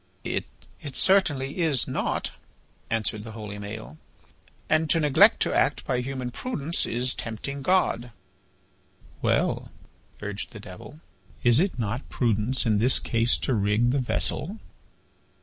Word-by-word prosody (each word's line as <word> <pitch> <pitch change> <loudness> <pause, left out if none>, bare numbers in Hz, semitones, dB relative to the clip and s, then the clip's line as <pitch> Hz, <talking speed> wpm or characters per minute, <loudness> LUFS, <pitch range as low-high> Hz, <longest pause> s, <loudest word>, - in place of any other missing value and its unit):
"It - - -2 0.5
certainly 150 -5 +2
is 155 -8 +2
not," - - -1 0.6
answered 110 -1 -1
the 110 0 -8
holy 105 -2 -7
Maël, 105 -6 -8 0.7
"and 155 0 +2
to 165 - +4
neglect 150 -3 +6
to - - +2
act - - +2
by 125 - 0
human 130 -1 -4
prudence 170 - -2
is 125 +2 -1
tempting 140 +5 -5
God." 135 -8 +2 1.1
"Well," - - +1 0.5
urged 105 +3 -5
the 105 - -8
Devil, 105 - -11 0.4
"is 120 +2 +6
it 185 -3 +1
not 120 +3 -3
prudence 120 +2 0
in 110 -3 +3
this 125 +4 +5
case 115 +1 +1
to 135 - +1
rig 105 +3 +2
the 140 - +1
vessel?" 165 - -1
125 Hz, 130 wpm, -26 LUFS, 110-145 Hz, 1.1 s, neglect